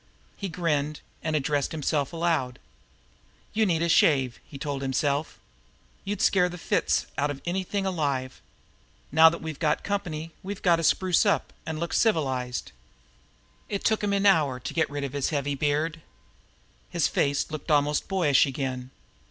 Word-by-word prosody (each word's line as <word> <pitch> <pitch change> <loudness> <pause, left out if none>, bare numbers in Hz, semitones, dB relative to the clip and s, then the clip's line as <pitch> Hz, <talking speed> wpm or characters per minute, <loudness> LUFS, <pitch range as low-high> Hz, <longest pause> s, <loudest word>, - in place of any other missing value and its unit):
He 195 - -5
grinned, 155 -4 -1 0.2
and 155 0 -1
addressed 145 -1 0
himself 145 -2 -1
aloud. 165 -7 0 1.0
"You 215 0 +2
need 165 -2 +1
a - - +2
shave," 135 -7 +3
he 140 - -11
told 140 0 -3
himself. 140 +2 -1 0.7
"You'd 205 0 -2
scare 180 -2 +4
fits 75 - 0
out 145 +1 +1
of 145 -1 -4
anything 190 +2 -2
alive! 140 -8 -2 0.7
Now 160 +2 +8
that 170 - -6
we've 160 -3 -5
got 150 -2 +1
company 165 -5 -3
we've 200 +1 -6
got 175 -2 +5
to 165 - -3
spruce 185 +2 +3
up, 200 -2 +1
an' 160 - -3
look 170 +2 -3
civilized." 130 - 0 1.0
It 200 -1 -3
took 220 -1 +2
him 205 - +1
an 200 0 +1
hour 150 -10 +4
to - - -6
get 160 - +1
rid 145 0 -4
of 140 -1 -4
his 140 -2 0
heavy 145 -2 -1
beard. 150 +3 -1 0.9
His 170 -2 +1
face 140 +1 0
looked 155 +1 -6
almost 150 -1 +2
boyish 165 -9 +3
again. 130 -2 -4
155 Hz, 160 wpm, -26 LUFS, 140-175 Hz, 1.0 s, Now